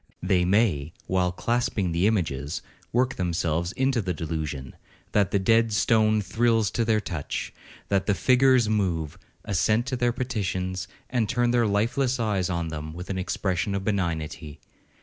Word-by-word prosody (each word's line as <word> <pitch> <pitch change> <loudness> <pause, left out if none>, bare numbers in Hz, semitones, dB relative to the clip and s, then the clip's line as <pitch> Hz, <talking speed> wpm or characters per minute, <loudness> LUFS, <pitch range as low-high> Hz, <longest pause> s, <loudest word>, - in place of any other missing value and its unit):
They 90 -1 +2
may, 90 -7 +2
while 90 -1 +1
clasping 110 -2 -1
the 85 +4 +2
images, 80 -8 -1 0.3
work 125 +2 +1
themselves 85 -1 -1
into 130 -2 +1
the 90 -3 -2
delusion, 75 -4 -4 0.4
that 100 -3 +2
the - - +1
dead 115 +3 +3
stone 110 0 +3
thrills 115 -1 +2
to 115 - 0
their 110 -1 +2
touch; 85 -8 -4 0.4
that 100 -1 +1
the 105 - +3
figures 130 -1 +4
move, 90 -8 -1 0.3
assent 110 +5 +1
to 130 -1 -2
their 120 -1 +1
petitions, 95 -7 -3 0.2
and 115 -4 +1
turn 120 0 +2
their 120 -2 +3
lifeless 120 +5 +1
eyes 100 -6 0
on 85 -2 -2
them 80 0 -6
with 90 +3 -6
an 95 - -2
expression 95 +1 -1
of 100 - -2
benignity. 80 -6 -2
100 Hz, 155 wpm, -26 LUFS, 85-115 Hz, 0.4 s, figures